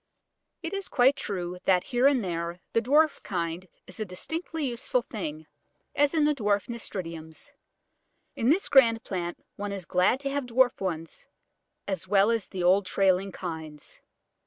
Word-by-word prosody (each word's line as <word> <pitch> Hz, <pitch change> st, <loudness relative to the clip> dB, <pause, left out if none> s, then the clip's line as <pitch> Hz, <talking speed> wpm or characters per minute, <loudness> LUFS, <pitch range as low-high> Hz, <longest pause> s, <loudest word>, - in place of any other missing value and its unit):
It 330 Hz, -, -4 dB
is 395 Hz, -1 st, -3 dB
quite 260 Hz, +3 st, +4 dB
true 180 Hz, -6 st, -4 dB
that 180 Hz, -2 st, +4 dB
here 250 Hz, +2 st, +3 dB
and 270 Hz, -5 st, +3 dB
there 170 Hz, -1 st, -3 dB
the 230 Hz, -, +3 dB
dwarf 295 Hz, +5 st, +3 dB
kind 170 Hz, 0 st, -3 dB, 0.2 s
is 185 Hz, -, -11 dB
a -, -, 0 dB
distinctly 315 Hz, -, -4 dB
useful 245 Hz, 0 st, -1 dB
thing, 155 Hz, -9 st, -6 dB, 0.5 s
as 290 Hz, +2 st, +2 dB
in 310 Hz, -2 st, +4 dB
the 300 Hz, -, +4 dB
dwarf 205 Hz, -6 st, 0 dB
Nasturtiums. 170 Hz, -, -6 dB, 0.8 s
In 235 Hz, -, +1 dB
this 360 Hz, +7 st, +3 dB
grand 230 Hz, -4 st, +5 dB
plant 175 Hz, -3 st, -5 dB
one 205 Hz, 0 st, -4 dB
is 195 Hz, -3 st, -5 dB
glad 185 Hz, +7 st, +2 dB
to 275 Hz, -1 st, -2 dB
have 280 Hz, -2 st, -2 dB
dwarf 245 Hz, -1 st, +3 dB
ones 165 Hz, -4 st, -4 dB, 0.6 s
as 185 Hz, -2 st, -3 dB
well 200 Hz, +3 st, +4 dB
as 230 Hz, -3 st, -1 dB
the 185 Hz, -2 st, -4 dB
old 185 Hz, +2 st, +4 dB
trailing 195 Hz, 0 st, +2 dB
kinds. 160 Hz, -5 st, -7 dB
200 Hz, 160 wpm, -27 LUFS, 180-255 Hz, 0.8 s, grand